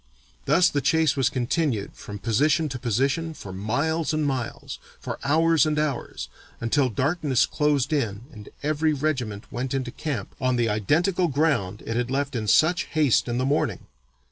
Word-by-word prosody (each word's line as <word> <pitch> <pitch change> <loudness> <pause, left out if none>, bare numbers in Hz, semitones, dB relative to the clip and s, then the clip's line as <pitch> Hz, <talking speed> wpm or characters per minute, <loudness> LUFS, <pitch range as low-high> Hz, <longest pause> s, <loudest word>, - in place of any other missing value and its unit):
"Thus 180 0 +5
the 145 -4 0
chase 155 +2 +2
was 135 -3 +2
continued, 125 - -1
from 105 - -8
position 145 - +2
to 130 -1 -5
position, 135 +8 0
for 95 -8 -9
miles 140 - -1
and 155 -1 0
miles, 130 -4 -3 0.2
for - - -5
hours 160 +3 +3
and 150 -1 0
hours, 150 -4 -2 0.3
until 130 +3 +1
darkness 140 - +1
closed 150 -1 +1
in 110 -8 -1
and 105 -6 -11
every 155 +1 +1
regiment 130 -8 -2
went 130 +3 -3
into 130 -2 -2
camp 135 -10 -4
on 130 -1 +2
the 120 -2 +1
identical 165 - +1
ground 140 - 0
it 115 - -3
had 120 +1 -1
left 140 +1 -1
in 110 -2 -2
such 160 - +4
haste 150 -7 +2
in 120 0 -1
the 130 - 0
morning. 145 +3 0
140 Hz, 170 wpm, -25 LUFS, 120-155 Hz, 0.3 s, Thus